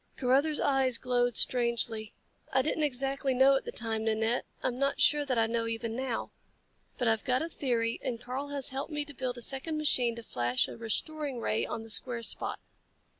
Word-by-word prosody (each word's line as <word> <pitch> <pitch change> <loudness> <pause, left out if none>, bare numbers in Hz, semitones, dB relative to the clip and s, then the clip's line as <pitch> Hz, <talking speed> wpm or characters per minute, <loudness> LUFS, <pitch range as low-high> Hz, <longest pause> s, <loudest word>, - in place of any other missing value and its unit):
Carruthers 280 +4 +2
eyes 265 -3 +3
glowed 245 -2 +1
strangely. 235 -3 +1 0.4
"I 265 0 +3
didn't 310 +2 -1
exactly 270 -1 0
know 270 +2 +6
at 270 - -1
the - - -4
time, 220 -1 -1
Nanette. 225 +2 +1 0.2
I'm 250 0 -1
not 275 0 0
sure 295 -1 +4
that 255 -3 -1
I 225 - +4
know 230 0 -1
even 230 0 -3
now. 255 -2 -3 0.7
But 245 - 0
I've 225 -2 +2
got 255 +3 +1
a - - -2
theory 235 -7 -1
and 245 -4 -3
Karl 255 +4 -5
has 285 -2 0
helped 270 +4 -4
me 295 -1 -2
to 290 - -10
build 255 -1 -3
a 240 - -4
second 280 +6 -3
machine 250 -6 +1
to 235 - -8
flash 120 - 0
a - - -8
restoring 275 +4 -1
ray 220 -1 -1
on 225 - -5
the 225 - -10
square 235 +1 +5
spot. - - -2
250 Hz, 200 wpm, -30 LUFS, 230-275 Hz, 0.7 s, know